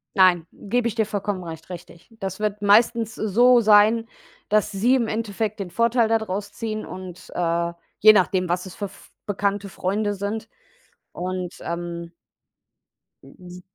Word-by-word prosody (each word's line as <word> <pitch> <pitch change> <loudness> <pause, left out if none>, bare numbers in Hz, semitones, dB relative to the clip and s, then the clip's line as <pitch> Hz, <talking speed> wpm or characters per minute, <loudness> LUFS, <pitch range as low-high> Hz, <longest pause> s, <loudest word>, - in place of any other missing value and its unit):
Nein, 180 -4 +4
gebe 240 +3 -1
ich 230 - -3
dir 220 -2 +1
vollkommen 200 -2 -3
recht, 165 0 -9
richtig. 175 -1 -11
Das 190 -1 -5
wird 210 -1 -2
meistens 225 +2 +4
so 240 +4 +4
sein, 220 +1 +5 0.4
dass 215 0 +2
sie 225 +6 +3
im 240 -3 +1
Endeffekt 215 -1 -3
den 195 -2 -4
Vorteil 230 +4 +2
da 225 0 +3
draus 205 -1 -4
ziehen 215 -1 -4
und, 185 -1 -9
äh, 170 0 0 0.3
je 215 +1 +9
nachdem, 185 -2 +2
was 180 +2 -1
es 185 - -11
f 200 -2 -7 0.2
Bekannte, 200 0 -1
Freunde 205 +3 -1
sind. 200 +3 -4 0.6
Und, 180 0 -4
ähm 170 0 -5 1.1
Mhm. 180 +6 -13
200 Hz, 150 wpm, -23 LUFS, 180-220 Hz, 1.1 s, je